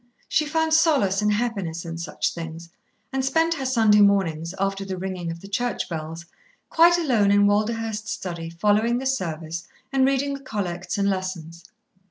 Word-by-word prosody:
She 305 - +1
found 320 +1 +1
solace 280 - +3
and 210 0 +2
happiness 200 -8 -2
in 165 0 -6
such 170 - -2
things, 165 0 -8 0.4
and 265 0 0
spent 325 +5 +2
her 270 -5 -3
Sunday 220 -5 +4
mornings, 180 -4 +2
after 195 0 -1
the 190 -1 -5
ringing 180 -2 -4
of 165 0 -6
the 195 - -10
church 240 +5 -2
bells, 165 0 -6 0.5
quite 340 +1 +6
alone 245 -12 +2
in 205 0 +5
Walderhurst's 220 +1 0
study, 170 -5 -5
following 210 +7 +2
the 265 - -4
Service 170 -8 -3 0.3
and 265 -1 +3
reading 275 +1 +1
the 275 - -5
Collects 190 -8 -4
and 200 0 +1
Lessons. 180 -4 -4
200 Hz, 170 wpm, -24 LUFS, 170-245 Hz, 0.5 s, quite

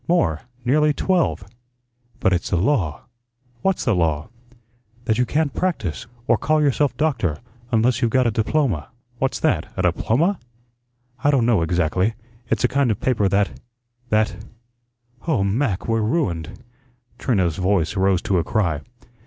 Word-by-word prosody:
More 90 - +2 0.2
nearly 150 +4 +3
twelve." 180 +2 +1 0.8
"But 95 - +2
it's 85 - -1
the - - +1
law." 90 - +1 0.6
"What's 195 -1 0
the 120 - +3
law?" 80 -3 0 0.8
"That 110 +1 +1
you 125 - +2
can't 150 -1 0
practise, 135 - -2 0.2
or - - +3
call 155 +1 +2
yourself 145 -1 +1
doctor, 115 - 0 0.3
unless 120 +2 +2
you've 120 - +2
got 130 +1 +2
a 115 - +2
diploma." 110 - 0 0.3
"What's - - 0
that - - +1
a - - 0
diploma?" 165 - +1 0.8
"I 145 - +4
don't 135 -5 +3
know 115 -7 +3
exactly. 90 +5 +1 0.3
It's - - 0
a - - +5
kind 140 0 +1
of 110 - 0
paper 110 -6 +1
that 100 +1 0 0.5
that 110 -3 +1 0.9
oh, 135 -12 +2
Mac, 100 0 0
we're 115 -1 +1
ruined." 105 - -2 0.6
Trina's 95 - +1
voice 95 -1 +1
rose 95 -2 +2
to 95 -3 +1
a - - 0
cry. 80 -5 0
110 Hz, 150 wpm, -22 LUFS, 90-140 Hz, 0.9 s, a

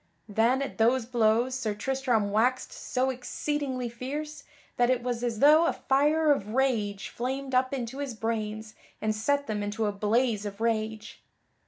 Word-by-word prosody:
Then, 230 +6 +2
at 270 - -7
those 235 +2 +3
blows 235 +1 +2
Sir 230 -5 -2
Tristram 240 -2 0
waxed 245 +5 +1
so 260 +1 -1
exceedingly 260 0 -3
fierce 285 +6 -6 0.3
that 245 0 +3
it 250 -2 +1
was 245 -1 -2
as 235 -2 -1
though 310 +4 +7
a - - +1
fire 300 +3 +2
of 215 -5 -1
rage 215 -7 0
flamed 265 +2 -4
up 255 +1 +2
into 260 0 -4
his 275 -5 -4
brains 220 -1 -3 0.3
and 215 0 0
set 285 +6 0
them 210 -4 -3
into 205 +2 -2
a 205 - +1
blaze 215 +2 +1
of 205 -1 -6
rage. 220 -1 -2
240 Hz, 165 wpm, -28 LUFS, 220-265 Hz, 0.3 s, though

